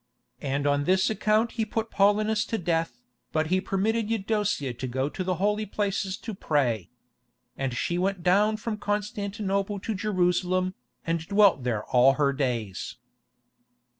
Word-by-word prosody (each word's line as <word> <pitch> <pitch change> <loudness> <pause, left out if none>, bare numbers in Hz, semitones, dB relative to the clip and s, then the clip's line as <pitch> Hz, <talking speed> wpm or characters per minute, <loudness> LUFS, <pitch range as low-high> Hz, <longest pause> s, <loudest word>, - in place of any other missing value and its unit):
And 140 +1 -1
on 145 0 +2
this 190 +4 +3
account 220 +1 +2
he 225 - -1
put 225 +1 -3
Paulinus 210 +2 +3
to 225 - -2
death, 165 - -1 0.3
but 155 +1 0
he 185 - +3
permitted 215 +3 0
Eudocia 205 - 0
to 130 +2 -5
go 130 +3 -1
to 185 - -4
the 185 0 0
Holy 210 +3 0
Places 195 -1 -1
to 225 - -6
pray. 125 - 0 0.7
And 135 -2 -2
she 175 +8 -1
went 190 -1 -1
down 205 +4 +3
from 215 0 -4
Constantinople 205 -1 -2
to 220 - -2
Jerusalem, 185 -2 +1 0.3
and 165 0 0
dwelt 200 -7 +5
there 115 -4 -1
all 130 +2 +5
her 140 -1 +1
days." 120 -8 -2
190 Hz, 150 wpm, -27 LUFS, 145-210 Hz, 0.7 s, dwelt